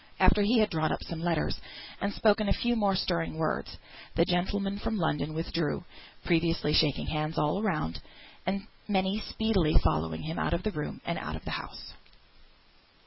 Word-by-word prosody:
After 210 - +5
he 220 +4 +4
had 215 -1 +3
drawn 155 -1 +1
up - - -2
some 170 - -5
letters, 170 -2 0 0.4
and 200 - 0
spoken 210 0 +3
a - - +4
few 240 0 +1
more 200 -4 +2
stirring 170 -4 -1
words, 160 -1 -1 0.4
the 170 - +4
gentleman 195 +3 0
from 220 +1 -1
London 155 -3 0
withdrew, 165 0 -1 0.4
previously 165 -3 +2
shaking 150 -3 +3
hands 155 +1 -2
all 150 +7 +2
round; 155 - -1 0.4
and 195 +2 -1 0.2
many 195 0 +1
speedily 210 -8 +1
followed 80 0 +1
him 160 +2 -4
out - - 0
of 170 - -3
the 215 - 0
room, 150 -6 -5
and - - -1
out - - -4
of - - -9
the - - -4
house. - - -6
175 Hz, 175 wpm, -30 LUFS, 155-205 Hz, 0.4 s, After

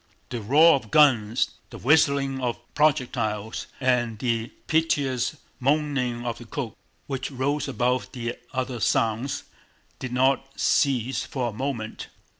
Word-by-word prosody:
The 120 -2 -3
roar 150 +10 +6
of 125 -6 -2
guns, 120 -6 +4 0.2
the - - -9
whistling 140 -1 +3
of 120 -2 -1 0.2
projectiles, 120 -8 0
and 125 -4 +1
the 115 -1 -1 0.2
piteous 145 -4 +1 0.2
moaning 135 -4 0
of 120 -1 -3
the 120 - -10
cook, 115 -1 -5 0.3
which 135 -1 -3
rose 140 +2 -1
above 125 -1 0
the 120 -2 -4 0.2
other 130 -2 -3
sounds, 120 +2 0 0.6
did 130 - -5
not 135 +2 +1
cease 130 -2 +2
for 125 -3 -2
a - - -8
moment. 115 -2 -4
130 Hz, 130 wpm, -25 LUFS, 120-140 Hz, 0.6 s, roar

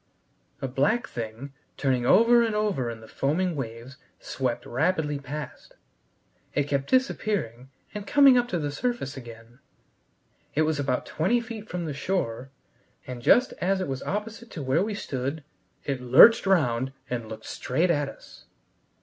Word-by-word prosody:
A - - 0
black 145 - +1
thing, 115 +4 -7 0.2
turning 130 -3 0
over 235 - +6
and 225 -2 0
over 205 - 0
in 115 -1 -7
the 110 - -13
foaming 165 +8 -1
waves, 120 0 -7 0.2
swept 130 -3 -3
rapidly 150 +1 0
past. 140 0 -8 0.8
It 145 - +3
kept 140 -1 -2
disappearing 200 - 0 0.2
and 210 0 -6
coming 280 -3 +7
up 245 0 +3
to 185 - -2
the 145 -3 -2
surface 240 - -3
again. 120 -1 -12 1.0
It 155 - +3
was 155 -1 0
about 135 -3 -1
twenty 205 +10 +1
feet 225 -2 -8
from 175 -1 -3
the 150 - -3
shore, 135 -6 -2 0.6
and 125 -1 -7
just 250 - +4
as 190 +2 +1
it 185 - -2
was 135 -1 -4
opposite 225 +3 -5
to 155 -8 -6
where 130 +7 +2
we 210 0 -3
stood 140 -2 -4 0.4
it 135 -3 -3
lurched 135 - +7
round 135 -8 +2
and 120 -4 -4
looked 110 - -8
straight 165 +8 0
at 145 -3 0
us. - - -15
145 Hz, 160 wpm, -26 LUFS, 125-200 Hz, 1.0 s, coming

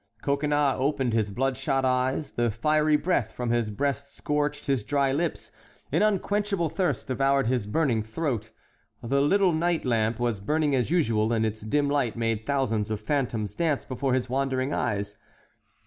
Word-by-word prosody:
Coconnas 145 0 +1
opened 135 -3 0
his 110 -2 +1
blood 130 +6 -1
shot 135 0 0
eyes; 130 +3 0
the 120 0 0
fiery 150 +7 +2
breath 150 -7 0
from 120 -1 -2
his 120 -2 +1
breast 140 +5 -2
scorched 150 0 -1
his 135 -6 0
dry 135 +4 +1
lips, 165 +5 -2 0.4
an - - +2
unquenchable 205 -3 +1
thirst 185 +2 -1
devoured 135 +1 +2
his 120 -3 0
burning 120 -2 +1
throat; 115 0 -3 0.5
the 135 +4 +1
little 190 +4 +3
night 170 0 0
lamp 115 -2 +1
was 120 -4 0
burning 150 +7 0
as 125 -3 +1
usual, 115 -10 +2
and 110 -1 +1
its 110 0 -3
dim 145 +7 +1
light 140 -5 0
made 115 -1 -2
thousands 115 -7 0
of 110 -1 -2
phantoms 115 -4 -1
dance 160 -5 0
before 130 0 -1
his 125 -1 -1
wandering 130 +1 -1
eyes. 100 0 -2
135 Hz, 165 wpm, -26 LUFS, 115-150 Hz, 0.5 s, little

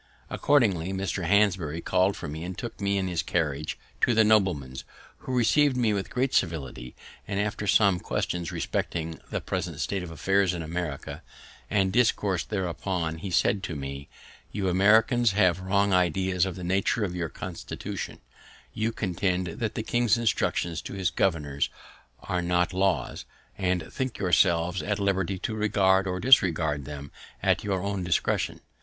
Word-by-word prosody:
Accordingly 100 - +2
Mr. 95 -1 -2
Hanbury 95 -5 +2
called 95 +3 +1
for 85 - -6
me 80 +2 -6
and 90 +1 -6
took 120 -3 -7
me 100 0 +1
in 95 -1 -1
his 85 -2 -1
carriage 75 -3 -2 0.2
to 120 - +3
that 110 - +6
nobleman's, 95 -12 +1 0.4
who - - -7
receiv'd 135 +3 +3
me 115 -4 +2
with 100 -2 -2
great 130 +1 -1
civility; 65 -7 -2 0.3
and 100 -1 -2
after 105 0 -2
some 100 -3 +4
questions 85 -1 -2
respecting 80 -1 -3
the - - -2
present - - -4
state 100 -2 -1
of 90 - -7
affairs 95 +4 +1
in 85 - -4
America 80 -3 -5 0.5
and 95 -2 +1
discourse 105 -6 +2
thereupon, 90 -4 -3
he 95 - -5
said 95 +2 +2
to 90 -4 -4
me: 70 0 -6 0.4
"You 95 -2 -1
Americans 110 +4 +4
have 95 -3 +3
wrong 100 +1 +1
ideas 90 +1 +2
of 95 - -5
the 90 - -7
nature 95 +5 +1
of 95 -3 -2
your 85 -2 -2
constitution; - - -6 0.5
you 110 +1 -1
contend 95 -3 -1
that 105 +6 -4
the 110 - -2
king's 120 0 +2
instructions 90 -7 0
to - - -8
his 95 -2 -1
governors 75 -7 0 0.5
are 90 -1 -1
not 90 +1 +1
laws, 95 0 0 0.3
and 90 -4 -1
think 130 -2 -3
yourselves 90 -1 +2
at 105 -1 -1
liberty 95 -2 0
to 110 - -3
regard 95 -3 +2
or 90 0 -2
disregard 80 - +4
them 70 -1 -8 0.3
at - - +2
your 95 -2 -1
own 100 -2 -2
discretion. 90 0 0
95 Hz, 160 wpm, -27 LUFS, 85-100 Hz, 0.5 s, that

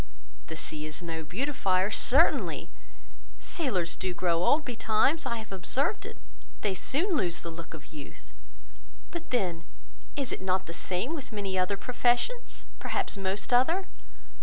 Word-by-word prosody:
The 160 - -5
sea 155 -1 -2
is 155 +3 -5
no 165 -1 -3
beautifier, 195 - +1
certainly; 280 +9 +3 0.7
sailors 185 - 0
do 185 -1 -2
grow 170 -1 +2
old 295 +10 +4
betimes; 235 +5 +2
I 235 - 0
have 220 -2 -8
observed 195 - 0
it; - - -9 0.4
they 205 -3 +1
soon 320 - +1
lose 175 - +1
the 170 - -4
look 165 0 -8
of 155 0 -13
youth. 145 -2 -10 0.8
But 340 -1 -6
then, 180 -9 0 0.5
is 275 -3 -1
not 190 0 +1
it - - -22
the 170 - -6
same 185 - -1
with 290 -7 -5
many 200 -3 -2
other 185 +2 +2
professions, 250 - 0 0.2
perhaps - - -1
most 195 +4 -1
other? 325 +10 +4
195 Hz, 150 wpm, -30 LUFS, 175-260 Hz, 0.8 s, old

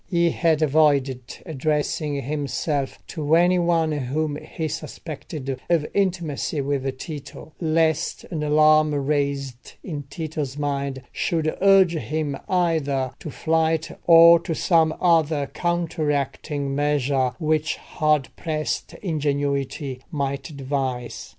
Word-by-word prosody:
He 170 -2 +2
had 160 -2 +2
avoided 140 -4 +2
addressing 150 -1 -1
himself 145 0 -2
to 155 0 0
any 180 +2 +4
one 170 -2 +2
whom 145 +2 -1
he 160 +1 -5
suspected 155 -2 -7 0.2
of 165 -3 +2
intimacy 175 -7 -1
with 135 -1 -2
Tito, 150 +1 -8
lest 160 -1 +1
an 160 -3 -2
alarm 155 0 +4
raised 140 -3 -2
in 155 -6 -5
Tito's 150 -3 -4
mind 140 -2 -2
should 160 -3 -1
urge 195 -3 +6
him 155 -2 -2
either 155 -8 +1
to - - -7
flight 160 +1 0 0.2
or 170 0 +9
to 165 - -4
some 160 -1 +3
other 160 -4 +3
counteracting 150 -4 -1
measure 140 -3 +1
which 155 -1 0
hard 150 -3 0
pressed 155 -2 -3
ingenuity 140 -4 -2
might 140 0 -3
devise. 130 -3 -3
150 Hz, 110 wpm, -23 LUFS, 140-160 Hz, 0.2 s, or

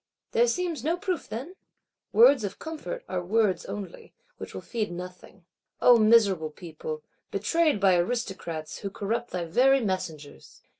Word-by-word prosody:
There 235 +1 +4
seems 325 +1 -1
no 330 +4 +1
proof, 370 -3 -3
then? 260 +11 -6 0.6
Words 245 +2 +6
of 200 -1 -4
comfort 325 +10 -6
are 180 -1 -3
words 200 -1 +1
only; 195 -4 -8 0.2
which - - -8
will - - -5
feed 220 -5 -3
nothing. 180 +1 -9 0.3
O 245 -1 +7
miserable 210 -7 +4
people, 460 - -7 0.3
betrayed 330 -8 +1
by 195 -2 +5
Aristocrats, 175 -6 -3
who 200 - -4
corrupt 215 +4 -3
thy 180 -2 -3
very 260 +11 +4
messengers! 180 -8 -5
215 Hz, 145 wpm, -27 LUFS, 180-270 Hz, 0.6 s, O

